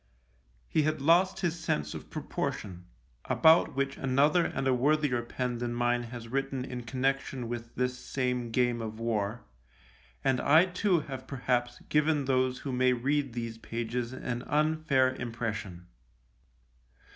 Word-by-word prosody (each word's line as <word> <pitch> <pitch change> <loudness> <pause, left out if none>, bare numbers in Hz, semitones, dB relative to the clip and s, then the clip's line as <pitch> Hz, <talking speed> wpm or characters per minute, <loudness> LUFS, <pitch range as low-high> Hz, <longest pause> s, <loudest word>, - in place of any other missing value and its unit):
He 155 - +2
had 155 0 0
lost 175 +7 +3
his 170 -2 -1
sense 75 - -1
of - - -8
proportion 90 -3 -4 0.2
— - - -36 0.2
about 160 -3 +5
which 135 0 -1
another 140 +6 +3
and 135 -1 -2
a 130 - +4
worthier 140 -1 +2
pen 120 0 -3
than 120 0 -2
mine 120 0 +1
has 120 -1 -8
written 135 +1 -2
in 125 -2 -6
con 125 +3 -5
nection 135 -2 0
with 120 0 -6
this 125 0 -1
same 125 -2 -2
game 120 0 +1
of 110 0 -6
war 110 -1 -1 0.4
— - - -29
and 130 -1 +2
I 160 +5 +6
too 180 -1 +1
have 135 -3 -7
perhaps 125 -2 -1
given 150 -1 +2
those 130 -1 +1
who 140 - -5
may 125 0 +3
read 135 +1 0
these 115 -1 -5
pages 115 +1 -3
an 125 -2 -4
unfair 150 -4 +2
impression. 110 -7 -5
125 Hz, 155 wpm, -30 LUFS, 120-140 Hz, 0.4 s, I